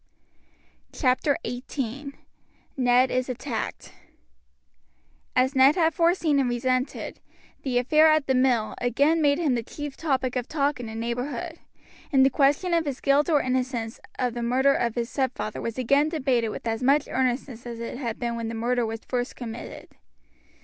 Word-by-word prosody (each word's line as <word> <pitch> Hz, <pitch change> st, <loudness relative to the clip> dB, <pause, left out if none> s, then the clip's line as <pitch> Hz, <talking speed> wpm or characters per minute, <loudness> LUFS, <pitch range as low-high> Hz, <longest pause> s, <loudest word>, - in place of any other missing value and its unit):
CHAPTER 270 Hz, +1 st, +1 dB
XVIII: 270 Hz, +2 st, -5 dB, 0.6 s
NED 250 Hz, 0 st, +3 dB
IS 255 Hz, 0 st, -1 dB
ATTACKED 250 Hz, -, -5 dB, 1.4 s
As 255 Hz, +2 st, +3 dB
Ned 265 Hz, +3 st, +6 dB
had 330 Hz, -2 st, +2 dB
foreseen 335 Hz, -3 st, +2 dB
and 260 Hz, -2 st, +1 dB
resented, 255 Hz, +2 st, -2 dB, 0.4 s
the 255 Hz, -3 st, -1 dB
affair 305 Hz, +6 st, +5 dB
at 310 Hz, -2 st, +3 dB
the 265 Hz, -, +1 dB
mill 255 Hz, -4 st, +2 dB
again 285 Hz, +7 st, +2 dB
made 285 Hz, -1 st, +3 dB
him 315 Hz, -6 st, +1 dB
the 240 Hz, -, 0 dB
chief 290 Hz, +4 st, -7 dB
topic 265 Hz, -5 st, -1 dB
of 250 Hz, -1 st, -2 dB
talk 285 Hz, -3 st, 0 dB
in 240 Hz, -, -6 dB
the 220 Hz, -, -7 dB
neighborhood, 250 Hz, +9 st, -4 dB, 0.5 s
and 265 Hz, -2 st, +5 dB
the 270 Hz, -, +3 dB
question 290 Hz, +6 st, +2 dB
of 335 Hz, -1 st, +2 dB
his 275 Hz, -3 st, -3 dB
guilt 280 Hz, +3 st, +2 dB
or 295 Hz, -3 st, +3 dB
innocence 250 Hz, -3 st, -2 dB, 0.2 s
of 250 Hz, -2 st, -1 dB
the 240 Hz, -, -4 dB
murder 260 Hz, +4 st, +3 dB
of 235 Hz, -4 st, -1 dB
his 235 Hz, -1 st, -1 dB
stepfather 260 Hz, -5 st, -2 dB
was 230 Hz, 0 st, -4 dB
again 280 Hz, +4 st, +3 dB
debated 260 Hz, -8 st, 0 dB
with -, -, -7 dB
as 225 Hz, +1 st, -2 dB
much 280 Hz, +3 st, +3 dB
earnestness 250 Hz, -1 st, -2 dB
as 235 Hz, -1 st, -6 dB
it 235 Hz, +2 st, -5 dB
had 235 Hz, -4 st, -3 dB
been 235 Hz, -1 st, -2 dB
when 230 Hz, -1 st, -4 dB
the 225 Hz, -, -4 dB
murder 240 Hz, +1 st, 0 dB
was 225 Hz, 0 st, -5 dB
first 245 Hz, 0 st, -2 dB
committed. 235 Hz, -1 st, -8 dB
255 Hz, 170 wpm, -25 LUFS, 240-285 Hz, 1.4 s, Ned